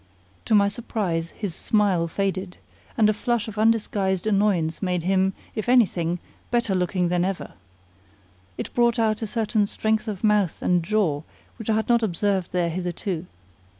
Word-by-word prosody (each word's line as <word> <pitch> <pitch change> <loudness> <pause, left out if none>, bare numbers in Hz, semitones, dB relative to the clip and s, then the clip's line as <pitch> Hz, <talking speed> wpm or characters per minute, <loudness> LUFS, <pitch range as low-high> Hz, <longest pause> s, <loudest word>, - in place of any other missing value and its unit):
To 220 - +3
my 200 -1 +5
surprise 200 -6 -2
his 200 -2 -5
smile 195 -4 +1
faded, 190 +1 -2 0.4
and 215 - +5
a 215 - +3
flush 235 +1 -1
of 215 -1 -6
undisguised 210 -4 +1
annoyance 195 -6 +1
made 180 -3 -1
him, 190 +1 +2 0.2
if 215 +2 -3
anything, 180 -9 +3 0.3
better 235 -4 +1
looking 180 -1 0
than 175 0 +1
ever. 190 0 -3 1.1
It - - -5
brought 240 0 +3
out 220 -1 +1
a 220 - -2
certain 215 -1 0
strength 220 +2 -1
of 205 -2 -5
mouth 210 -5 +2
and 180 -1 +3
jaw 170 -6 0 0.4
which 225 - -6
I 220 - +3
had 220 - 0
not 235 -1 +4
observed 195 -2 0
there 175 -2 0
hitherto. 180 0 -3
200 Hz, 160 wpm, -24 LUFS, 180-220 Hz, 1.1 s, my